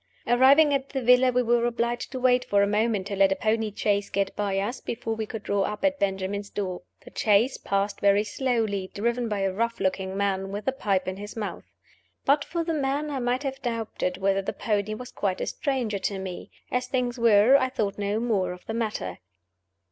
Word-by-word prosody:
Arriving 275 +5 +6
at 275 0 -1
the 270 - -3
villa, 250 +1 +5
we 250 0 +2
were 240 0 +2
obliged 235 0 -2
to 260 - -4
wait 250 0 +3
for 200 0 +2
a - - +2
moment 210 -1 +1
to 200 - -4
let 195 0 +4
a - - +3
pony 220 0 0
chaise 205 0 0
get 195 0 -1
by 200 -2 -1
us 205 +6 -2
before 225 -1 -3
we 220 -1 -4
could 220 -1 -6
draw 200 -1 0
up 210 +7 -2
at 285 0 +1
Benjamin's 200 +1 -2
door. 185 -3 -4 0.2
The - - -12
chaise 220 +5 +3
passed 200 +1 -1
very 200 +1 +4
slowly, 215 -5 -1
driven 235 +3 -1
by 205 -2 -1
a 195 -1 0
rough 230 +3 -1
looking 190 0 -1
man, 195 -1 -1
with 205 +3 -5
a - - +4
pipe 200 -8 -1
in 185 0 -3
his 205 +1 -8
mouth. 210 -2 -5 0.6
But 285 +1 +4
for 335 0 -3
the 330 0 -2
man, 290 +1 -1
I 275 - -2
might 250 +2 0
have 270 -1 -4
doubted 225 -6 -2
whether 195 0 +1
the 195 - -4
pony 215 -1 -1
was 250 +3 -9
quite 190 -2 -2
a - - -1
stranger 245 -8 -2
to 200 0 -2
me. 190 -2 -6 0.2
As 250 0 0
things 250 -2 -1
were, 230 +2 +6
I 260 -2 +3
thought 210 -6 -2
no 205 +1 0
more 200 -6 0
of 180 - -14
the 225 - -4
matter. 210 - -3
215 Hz, 215 wpm, -26 LUFS, 200-250 Hz, 0.6 s, Arriving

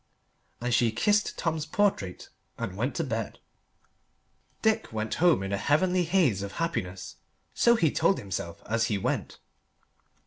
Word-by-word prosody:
And 120 0 -1
she 115 -1 +3
kissed 205 - +1
Tom's 160 -2 -2
portrait 155 - 0 0.3
and 95 - -4
went 120 +7 -2
to 165 - 0
bed. 115 -6 -3 1.3
Dick 220 0 +1
went 110 0 -3
home 175 - +4
in 95 +1 -3
a - - +1
heavenly 180 - +2
haze 160 - +2
of 100 0 -5
happiness 95 - -3 0.4
so 235 0 +4
he 165 -10 +2
told 195 - +2
himself 85 -4 -5
as 115 +1 +1
he 105 -3 0
went. 95 - -2
125 Hz, 145 wpm, -28 LUFS, -, 1.3 s, home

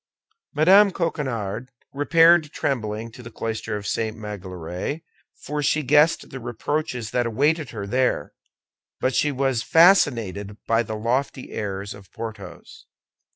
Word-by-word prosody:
Mme. 190 +7 +6
Coquenard 130 - -3 0.2
repaired 165 +2 +4
trembling 115 -6 -3
to 125 - -12
the 115 - -10
cloister 110 -2 -4
of 100 - -8
St. 110 +1 -2
Magloire, 95 - -6 0.4
for 150 +1 -3
she 150 +1 +1
guessed 150 +4 +3
the 135 - -6
reproaches 125 0 -3
that 120 -1 +1
awaited 145 +6 +1
her 105 -4 -6
there; 125 +5 0 0.7
but 130 - 0
she 150 - +2
was 135 -3 0
fascinated 115 - +3
by 115 0 +2
the 110 -1 -5
lofty 125 +4 -2
airs 100 -1 -4
of 100 -2 -15
Porthos. 110 -3 -9
120 Hz, 130 wpm, -23 LUFS, 105-150 Hz, 0.7 s, Mme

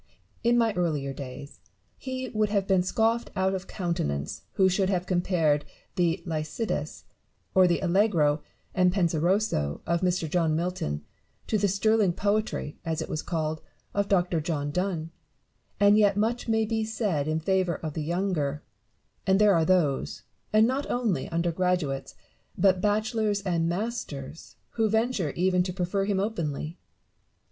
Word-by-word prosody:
In 240 +1 +4
my 230 -2 +3
early 155 -7 -1
days, 140 +1 -8 0.4
he 260 -1 -5
would 215 -1 0
have 200 -2 +1
been 190 -2 +3
scoffed 225 +5 +1
out 190 +1 +1
of 190 0 -4
countenance 75 - -2
who 190 - +4
should 190 +1 +1
have 180 -2 0
compared 175 -5 +1 0.3
the 175 -2 +1
Lycidas, 160 +7 -3 0.5
or 185 -1 +6
the 175 - +1
Allegro 170 -6 +2 0.3
and 185 -1 +3
Fenseroso, 175 - +1
of 170 0 0
Mr. 180 -3 +1
John 160 -1 +1
Milton 160 - -2 0.4
to 215 - 0
the 200 - +3
sterling 200 0 +2
poetry 205 -5 -1
(as 160 -1 -2
it - - -9
was 155 - -2
called) 155 -2 -2 0.3
of 200 0 0
Dr. 175 -4 +2
John 150 -3 -2
Donne: 170 -2 -2 0.7
and 205 +1 +6
yet 205 -2 +4
much 230 +4 0
may 220 -1 +2
be 220 0 -1
said 210 -9 -1
in 155 +1 0
favour 185 0 +1
of 155 -2 -5
the 155 - -3
younger; 160 -4 -1 0.6
and 190 0 +5
there 210 0 +5
are 165 -2 +3
those, 160 -7 +1 0.3
and 215 +1 +5
not 265 +4 -1
only 220 - 0
under 170 +1 0
graduates, 170 -6 -1 0.4
but 190 -2 +3
bachelors 215 0 +1
and 170 -3 0
masters, 170 - -5 0.2
who 225 -2 +1
venture 220 -6 +1
even 180 0 +2
to 180 +1 -1
prefer 185 +2 -1
him 200 -1 0
openly. 165 -5 -3
180 Hz, 155 wpm, -27 LUFS, 160-205 Hz, 0.7 s, or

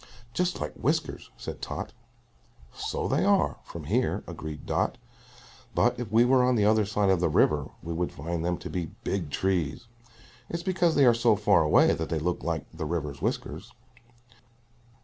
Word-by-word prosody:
"Just 180 +3 0
like 75 - -4
whiskers," - - -2
said - - -7
Tot. - - -5 0.8
"So - - -3
they - - +1
are, - - +2
from 85 - -9
here," 115 - 0
agreed 80 -1 -7
Dot; - - 0 0.8
"but 120 0 +2
if 120 -5 -5
we 115 +2 +5
were 130 0 +4
on 125 0 +3
the 105 -3 +3
other 110 0 +4
side 100 -1 +1
of 95 - +3
the 90 - +2
river 75 -2 +2
we 85 0 -4
would 85 +1 -1
find 80 +3 -4
them 90 0 0
to - - -8
be 90 -3 -2 0.2
big 90 -6 -2
trees. 85 +1 -1 0.6
It's 170 0 -4
because 175 -3 +2
they 140 - +5
are 120 - +7
so 115 -1 +3
far 100 -4 +4
away 75 -1 +5
that 80 - -3
they 80 - 0
look 85 +3 -1
like 80 -1 -2
the 80 -1 -4
river's 75 -3 -3
whiskers." 100 +11 -3
90 Hz, 180 wpm, -27 LUFS, 80-120 Hz, 0.8 s, are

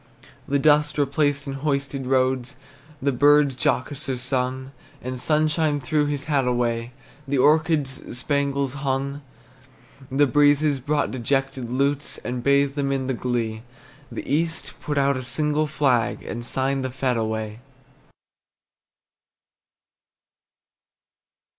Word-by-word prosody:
The 140 - +2
dust 150 +1 +3
replaced 145 0 +1
in 135 - -4
hoisted 140 -1 -2
roads, 130 -1 +1 0.5
The 140 - +2
birds 145 +1 +4
jocoser 130 +2 -1
sung; 130 +1 -2 0.3
The 130 0 -4
sunshine 155 +1 +1
threw 145 +3 0
his 145 -1 -2
hat 140 -4 +1
away, 120 -1 0 0.4
The 140 0 0
orchards 150 -3 +1
spangles 140 0 0
hung. 140 0 -2 0.9
The 140 +2 +3
breezes 145 +1 +3
brought 145 +3 0
dejected 130 0 -1
lutes, 140 +3 0
And 125 0 -4
bathed 140 +1 +3
them 140 -1 -1
in 135 -1 -1
the 130 - -1
glee; 115 -3 -2 0.5
The - - -6
East 165 +2 -1
put 145 -1 -3
out 140 -1 +2
a - - -4
single 150 +4 +1
flag, 135 -6 +1
And 120 +1 -5
signed 135 +2 0
the 130 - -2
fete 130 0 -1
away. 110 -1 -3
135 Hz, 120 wpm, -23 LUFS, 130-145 Hz, 0.9 s, birds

